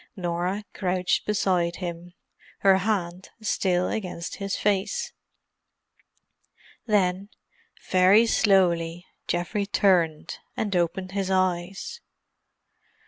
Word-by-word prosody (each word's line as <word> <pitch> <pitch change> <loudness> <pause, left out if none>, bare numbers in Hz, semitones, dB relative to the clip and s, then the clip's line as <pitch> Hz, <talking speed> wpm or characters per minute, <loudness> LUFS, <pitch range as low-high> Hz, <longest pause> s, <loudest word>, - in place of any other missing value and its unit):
Norah 180 +2 -2
crouched 180 -1 0
beside 180 -5 +1
him, 175 -1 -6 0.5
her 195 -1 +6
hand 185 -3 -2
still 185 -4 0
against 180 -5 -4
his 195 -1 -3
face. 210 - -1 1.7
Then, 195 -2 +1 0.6
very 190 +5 +6
slowly, 175 -6 +2 0.2
Geoffrey 175 +4 -1
turned, 175 -6 +1 0.2
and 205 -3 -1
opened 180 +2 -1
his 195 -1 -2
eyes. 185 - -1
185 Hz, 85 wpm, -25 LUFS, 175-200 Hz, 1.7 s, her